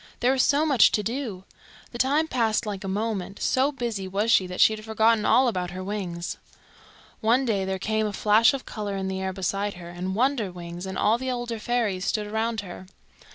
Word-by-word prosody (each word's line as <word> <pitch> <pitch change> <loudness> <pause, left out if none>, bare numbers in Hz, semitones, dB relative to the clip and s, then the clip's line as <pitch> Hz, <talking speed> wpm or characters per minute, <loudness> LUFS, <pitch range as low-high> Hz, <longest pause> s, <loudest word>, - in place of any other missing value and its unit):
There 250 - +3
was 265 -1 +2
so 290 +4 +3
much 275 -7 +5
to 210 - +1
do! 225 -5 -4 0.5
The 240 - -8
time 290 +5 +2
passed 230 -5 +1
like 205 -2 -5
a - - -4
moment. 200 -1 -3
So 265 +3 +2
busy 235 -8 -4
was 205 +4 0
she 190 -5 +4
that 180 0 -7
she 220 - +6
had 215 - -10
forgotten 220 0 +2
all 260 0 +5
about 180 -6 -1
her 185 +1 -6
wings. 185 -4 -4 0.8
One 240 +5 +2
day 200 -5 0
there 190 0 -2
came 215 +2 0
a 205 - -5
flash 215 +3 +4
of 270 - -7
colour 205 -2 -4
in 190 0 -3
the 190 0 -3
air 190 0 -2
beside 195 +2 -2
her, 175 -1 -10
and 180 +2 -4
Wonderwings 190 -8 -2
and 190 - -5
all 220 +3 +2
the 260 0 -3
older 240 -2 -3
fairies 215 -5 -1
stood 210 0 -1
around 220 +1 -1
her. 185 -1 -10
210 Hz, 210 wpm, -25 LUFS, 190-235 Hz, 0.8 s, she